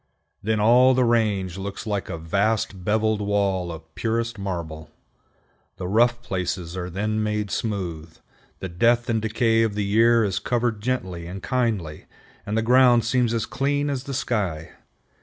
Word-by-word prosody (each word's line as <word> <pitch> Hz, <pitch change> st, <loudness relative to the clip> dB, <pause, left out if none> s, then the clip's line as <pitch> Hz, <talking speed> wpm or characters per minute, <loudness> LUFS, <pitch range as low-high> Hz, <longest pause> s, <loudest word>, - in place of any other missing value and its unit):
Then 110 Hz, +1 st, 0 dB
all 125 Hz, +4 st, +5 dB
the 130 Hz, -, +3 dB
range 105 Hz, -6 st, +1 dB
looks 100 Hz, +2 st, -6 dB
like 100 Hz, -4 st, -2 dB
a -, -, -4 dB
vast 100 Hz, +3 st, -1 dB
beveled 110 Hz, +1 st, +1 dB
wall 100 Hz, -3 st, 0 dB
of 80 Hz, 0 st, -11 dB
purest 115 Hz, 0 st, -2 dB
marble. 85 Hz, -5 st, -5 dB, 0.9 s
The 90 Hz, -, -4 dB
rough 120 Hz, +4 st, +2 dB
places 90 Hz, -3 st, -3 dB
are 90 Hz, -1 st, -4 dB
then 105 Hz, +4 st, -1 dB
made 105 Hz, -2 st, -2 dB
smooth, 85 Hz, -7 st, -4 dB, 0.4 s
the 95 Hz, -, -3 dB
death 115 Hz, +7 st, +2 dB
and 110 Hz, -1 st, 0 dB
decay 115 Hz, +1 st, +2 dB
of 110 Hz, -3 st, 0 dB
the 105 Hz, -1 st, -1 dB
year 115 Hz, +3 st, +4 dB
is 95 Hz, -2 st, -1 dB
covered 120 Hz, -3 st, -1 dB
gently 95 Hz, -9 st, -3 dB
and 95 Hz, +2 st, -8 dB
kindly, 110 Hz, -12 st, -1 dB, 0.4 s
and 105 Hz, +2 st, -1 dB
the 115 Hz, -, +1 dB
ground 125 Hz, 0 st, +5 dB
seems 125 Hz, -1 st, +1 dB
as 115 Hz, -2 st, -1 dB
clean 145 Hz, +2 st, -1 dB
as 135 Hz, -1 st, -4 dB
the 140 Hz, -, -4 dB
sky. 95 Hz, -, -2 dB
105 Hz, 160 wpm, -24 LUFS, 95-115 Hz, 0.9 s, all